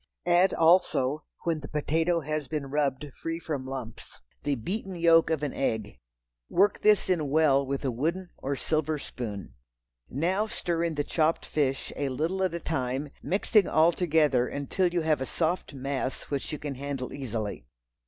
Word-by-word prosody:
Add 175 Hz, +2 st, +5 dB
also, 155 Hz, -4 st, +3 dB, 0.2 s
when 165 Hz, -2 st, 0 dB
the 140 Hz, -, -8 dB
potato 160 Hz, +3 st, +1 dB
has 155 Hz, -1 st, -3 dB
been 145 Hz, -4 st, -4 dB
rubbed 140 Hz, -2 st, 0 dB
until 145 Hz, -4 st, -10 dB
free 165 Hz, 0 st, -3 dB
from 145 Hz, -6 st, -4 dB
lumps, 130 Hz, -4 st, -7 dB, 0.2 s
the 145 Hz, -1 st, 0 dB
beaten 190 Hz, -, -4 dB
yolk 165 Hz, -1 st, +5 dB
of 160 Hz, -2 st, 0 dB
an 145 Hz, -, -1 dB
egg. 110 Hz, -, -2 dB, 0.5 s
Work 205 Hz, 0 st, +3 dB
this 210 Hz, -1 st, +4 dB
in 165 Hz, -6 st, +1 dB
well 140 Hz, -2 st, +4 dB
with 140 Hz, +1 st, -3 dB
a 130 Hz, -, +1 dB
wooden 170 Hz, +9 st, -2 dB
or 140 Hz, +1 st, -2 dB
silver 155 Hz, +2 st, 0 dB
spoon. 105 Hz, -, -6 dB, 0.6 s
Now 185 Hz, -, 0 dB
stir 170 Hz, -5 st, -1 dB
in 165 Hz, -2 st, -2 dB
the 145 Hz, -, 0 dB
chopped 160 Hz, +2 st, +1 dB
fish, 135 Hz, -3 st, -1 dB
a 140 Hz, -1 st, -1 dB
little 160 Hz, +9 st, -1 dB
at 185 Hz, -3 st, +1 dB
a -, -, -2 dB
time, 135 Hz, -2 st, -2 dB
mixing 205 Hz, +2 st, +3 dB
all 160 Hz, +2 st, +5 dB
together 150 Hz, -8 st, +2 dB
until 145 Hz, +6 st, 0 dB
you 175 Hz, -1 st, +1 dB
have 155 Hz, -3 st, +1 dB
a 130 Hz, -, -2 dB
soft 165 Hz, -2 st, -1 dB
mass 135 Hz, 0 st, -3 dB
which 140 Hz, -2 st, -2 dB
you 150 Hz, -, -3 dB
can 145 Hz, -1 st, -4 dB
handle 135 Hz, -1 st, -4 dB
easily. 110 Hz, -, -4 dB
150 Hz, 175 wpm, -28 LUFS, 135-165 Hz, 0.6 s, Add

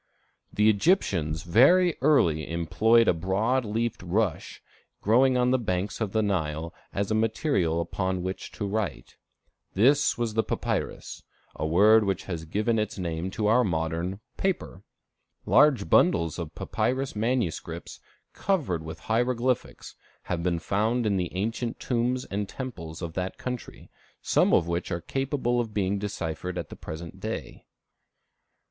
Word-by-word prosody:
The 105 Hz, +1 st, +2 dB
Egyptians 100 Hz, -, +2 dB
very 160 Hz, -, +5 dB
early 85 Hz, -, +3 dB
employed 110 Hz, +8 st, +3 dB
a -, -, +5 dB
broad 100 Hz, +10 st, 0 dB
leafed 115 Hz, +2 st, -2 dB
rush 90 Hz, 0 st, -1 dB, 0.4 s
growing 125 Hz, +4 st, +4 dB
on 125 Hz, 0 st, +3 dB
the 130 Hz, -, +3 dB
banks 100 Hz, -1 st, -2 dB
of 105 Hz, -3 st, -1 dB
the 110 Hz, +1 st, +1 dB
Nile, 85 Hz, -4 st, -2 dB, 0.2 s
as 100 Hz, +1 st, -2 dB
a -, -, +3 dB
material 110 Hz, -, +1 dB
upon 90 Hz, +2 st, -2 dB
which 95 Hz, +1 st, -5 dB
to 105 Hz, -, -4 dB
write. 100 Hz, -1 st, -3 dB, 0.6 s
This 135 Hz, +9 st, +4 dB
was 120 Hz, -2 st, -1 dB
the 110 Hz, -, +3 dB
papyrus, -, -, -3 dB, 0.3 s
a 80 Hz, -, -2 dB
word 105 Hz, +7 st, +6 dB
which 95 Hz, -2 st, -1 dB
has 85 Hz, -4 st, -5 dB
given 110 Hz, +7 st, 0 dB
its 110 Hz, 0 st, -2 dB
name 85 Hz, -1 st, -3 dB
to 105 Hz, +3 st, -3 dB
our 115 Hz, +4 st, +4 dB
modern 85 Hz, 0 st, -2 dB, 0.2 s
paper. 185 Hz, -, -2 dB, 0.6 s
Large 145 Hz, -, +4 dB
bundles 85 Hz, +1 st, +3 dB
of 85 Hz, -3 st, -6 dB
papyrus 130 Hz, 0 st, -1 dB
manuscripts, 115 Hz, -5 st, -2 dB, 0.3 s
covered 150 Hz, -, -1 dB
with 80 Hz, 0 st, -8 dB
hieroglyphics, 125 Hz, +2 st, -1 dB, 0.3 s
have 85 Hz, -2 st, -3 dB
been 85 Hz, -1 st, 0 dB
found 110 Hz, +7 st, 0 dB
in 100 Hz, -2 st, +1 dB
the 90 Hz, -2 st, -2 dB
ancient 115 Hz, +4 st, -2 dB
tombs 125 Hz, +1 st, -1 dB
and 100 Hz, 0 st, -3 dB
temples 90 Hz, -11 st, -7 dB
of 85 Hz, -1 st, -5 dB
that 90 Hz, +1 st, -3 dB
country, 125 Hz, -1 st, -7 dB, 0.3 s
some -, -, +2 dB
of 85 Hz, -, +3 dB
which 85 Hz, +1 st, -2 dB
are 85 Hz, -, -1 dB
capable 130 Hz, -, -1 dB
of 110 Hz, -3 st, -7 dB
being 100 Hz, 0 st, 0 dB
deciphered 90 Hz, -3 st, -4 dB
at 85 Hz, -4 st, -4 dB
the -, -, -9 dB
present 80 Hz, +1 st, -8 dB
day. -, -, -6 dB
100 Hz, 145 wpm, -27 LUFS, 85-120 Hz, 0.6 s, word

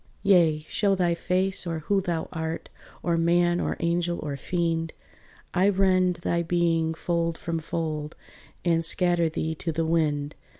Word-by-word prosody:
"Yea, 165 Hz, -6 st, +4 dB
show 200 Hz, -2 st, +2 dB
thy 175 Hz, -2 st, +2 dB
face 185 Hz, +2 st, -1 dB
or 165 Hz, -2 st, -3 dB
who 195 Hz, +5 st, +1 dB
thou 170 Hz, -3 st, -2 dB
art, 160 Hz, 0 st, -4 dB, 0.3 s
Or, 170 Hz, -1 st, +1 dB
man 175 Hz, +1 st, +3 dB
or -, -, -2 dB
angel 170 Hz, 0 st, 0 dB
or 145 Hz, -2 st, -3 dB
fiend, 165 Hz, +2 st, -1 dB, 0.6 s
I 190 Hz, +2 st, +4 dB
rend 185 Hz, -2 st, +3 dB
thy 170 Hz, 0 st, +1 dB
being 165 Hz, -1 st, +1 dB
fold 170 Hz, -1 st, -1 dB
from 165 Hz, -1 st, -3 dB
fold, 155 Hz, -1 st, -4 dB, 0.5 s
And 165 Hz, -1 st, +2 dB
scatter 175 Hz, 0 st, +2 dB
thee 160 Hz, 0 st, -2 dB
to 165 Hz, +1 st, -4 dB
the 165 Hz, +1 st, -1 dB
wind." 150 Hz, -3 st, 0 dB
170 Hz, 155 wpm, -26 LUFS, 160-175 Hz, 0.6 s, Yea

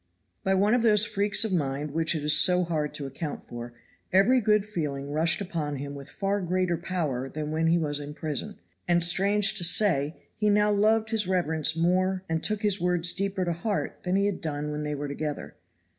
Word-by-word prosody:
By 190 Hz, -, +2 dB
one 205 Hz, +3 st, +3 dB
of 245 Hz, -, +3 dB
those 215 Hz, -2 st, +4 dB
freaks 205 Hz, 0 st, +2 dB
of 210 Hz, -, -2 dB
mind 145 Hz, -2 st, -2 dB
which 165 Hz, +2 st, 0 dB
it 150 Hz, -, -3 dB
is 150 Hz, +1 st, +4 dB
so 180 Hz, 0 st, +4 dB
hard 155 Hz, -4 st, -2 dB
to 145 Hz, -, -4 dB
account 140 Hz, +3 st, -6 dB
for, 120 Hz, 0 st, -8 dB, 0.4 s
every 220 Hz, +7 st, +4 dB
good 210 Hz, -1 st, +2 dB
feeling 145 Hz, -8 st, -4 dB
rushed 160 Hz, +5 st, +1 dB
upon 160 Hz, -6 st, -3 dB
him 140 Hz, +1 st, -6 dB
with 140 Hz, -1 st, -10 dB
far 200 Hz, +1 st, -2 dB
greater 180 Hz, 0 st, 0 dB
power 155 Hz, -7 st, -3 dB
than 150 Hz, +1 st, -5 dB
when 160 Hz, +1 st, 0 dB
he 165 Hz, +1 st, +3 dB
was 150 Hz, -3 st, -1 dB
in 145 Hz, 0 st, -8 dB
Prison, 160 Hz, +8 st, -4 dB, 0.3 s
and, 175 Hz, -1 st, +3 dB
strange 200 Hz, +4 st, +3 dB
to -, -, -4 dB
say, 170 Hz, -5 st, +2 dB, 0.2 s
he 210 Hz, -1 st, +1 dB
now 210 Hz, 0 st, +3 dB
loved 220 Hz, +2 st, +2 dB
his 215 Hz, -4 st, 0 dB
reverence 160 Hz, -4 st, +1 dB
more 185 Hz, +2 st, +1 dB
and 160 Hz, 0 st, -2 dB
took 215 Hz, -1 st, 0 dB
his 205 Hz, -3 st, +2 dB
words 175 Hz, -1 st, +3 dB
deeper 195 Hz, -1 st, -2 dB
to 170 Hz, -, -1 dB
heart 200 Hz, +5 st, -3 dB
than 180 Hz, +1 st, -1 dB
he 200 Hz, +1 st, +2 dB
had 200 Hz, -2 st, -2 dB
done 150 Hz, -2 st, -3 dB
when 150 Hz, 0 st, -4 dB
they 150 Hz, 0 st, -3 dB
were 145 Hz, +1 st, -4 dB
together. 145 Hz, +1 st, -5 dB
175 Hz, 210 wpm, -27 LUFS, 150-200 Hz, 0.4 s, those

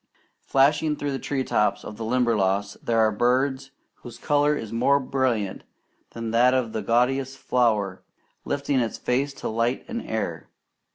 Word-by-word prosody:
Flashing 150 Hz, +3 st, +2 dB
through 145 Hz, -1 st, -3 dB
the 135 Hz, -, -3 dB
tree 135 Hz, -2 st, -2 dB
tops 105 Hz, -4 st, 0 dB
of 105 Hz, -, -8 dB
the 115 Hz, -, -6 dB
Limberlost 105 Hz, -5 st, 0 dB
there 115 Hz, -, 0 dB
are 110 Hz, -1 st, +4 dB
birds 130 Hz, +5 st, +1 dB, 0.3 s
whose 120 Hz, -, -11 dB
colour 145 Hz, 0 st, +2 dB
is 110 Hz, -4 st, -6 dB
more 140 Hz, +5 st, +3 dB
brilliant 130 Hz, -7 st, -1 dB, 0.5 s
than 115 Hz, -1 st, -4 dB
that 125 Hz, +3 st, +4 dB
of 120 Hz, -4 st, -1 dB
the 110 Hz, -, -2 dB
gaudiest 130 Hz, +3 st, +1 dB
flower 105 Hz, -8 st, 0 dB, 0.4 s
lifting 140 Hz, -1 st, -1 dB
its 115 Hz, -2 st, -2 dB
face 135 Hz, +3 st, 0 dB
to -, -, -5 dB
light 115 Hz, +3 st, -1 dB
and 235 Hz, -1 st, -4 dB
air. 85 Hz, -8 st, -4 dB
125 Hz, 160 wpm, -24 LUFS, 110-135 Hz, 0.5 s, are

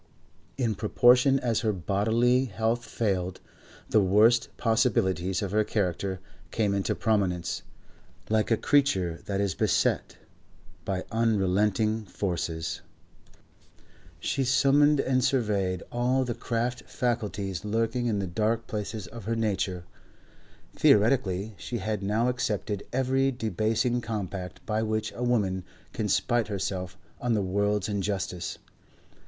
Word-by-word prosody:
In 120 Hz, -5 st, +1 dB
proportion 125 Hz, +6 st, +4 dB
as 115 Hz, -3 st, +1 dB
her 110 Hz, -, +1 dB
bodily 110 Hz, +7 st, +2 dB
health 115 Hz, +2 st, -1 dB
failed, 95 Hz, -5 st, -2 dB, 0.5 s
the 110 Hz, -, +4 dB
worst 110 Hz, +5 st, +4 dB
possibilities 105 Hz, -6 st, +1 dB
of 95 Hz, -, -3 dB
her 105 Hz, +1 st, +3 dB
character 95 Hz, -2 st, -1 dB, 0.3 s
came 105 Hz, -3 st, 0 dB
into 100 Hz, -1 st, 0 dB
prominence. 90 Hz, -6 st, 0 dB, 0.7 s
Like 110 Hz, 0 st, +1 dB
a 115 Hz, -, +3 dB
creature 95 Hz, -, +2 dB
that 100 Hz, -1 st, -1 dB
is 100 Hz, -3 st, 0 dB
beset -, -, 0 dB, 0.7 s
by 95 Hz, -1 st, -2 dB
unrelenting 105 Hz, 0 st, +1 dB
forces, 85 Hz, -4 st, -3 dB, 1.4 s
she 135 Hz, -, -1 dB
summoned 140 Hz, +3 st, +4 dB
and 130 Hz, -1 st, +1 dB
surveyed 100 Hz, -8 st, 0 dB
all 125 Hz, +2 st, +1 dB
the 120 Hz, -, -2 dB
craft 120 Hz, +2 st, -3 dB
faculties 105 Hz, -6 st, -2 dB
lurking 115 Hz, +3 st, 0 dB
in 110 Hz, -3 st, 0 dB
the 100 Hz, -, -1 dB
dark 110 Hz, +5 st, 0 dB
places 105 Hz, -1 st, -4 dB
of 110 Hz, +3 st, -10 dB
her 115 Hz, +1 st, -1 dB
nature; 100 Hz, -5 st, -1 dB, 0.9 s
theoretically 105 Hz, -2 st, +3 dB
she 120 Hz, -, -4 dB
had 105 Hz, 0 st, -2 dB
now 105 Hz, +5 st, +1 dB
accepted 105 Hz, -5 st, -2 dB
every 135 Hz, +1 st, +2 dB
debasing 115 Hz, +1 st, 0 dB
compact 100 Hz, -5 st, -5 dB
by 110 Hz, 0 st, 0 dB
which 110 Hz, 0 st, -1 dB
a -, -, -8 dB
woman 105 Hz, -7 st, +1 dB, 0.3 s
can -, -, -2 dB
spite 120 Hz, -2 st, +1 dB
herself 95 Hz, -3 st, -3 dB, 0.2 s
on 120 Hz, -1 st, 0 dB
the 105 Hz, -, +1 dB
world's 100 Hz, +1 st, 0 dB
injustice. 95 Hz, -4 st, -3 dB
110 Hz, 125 wpm, -27 LUFS, 95-120 Hz, 1.4 s, proportion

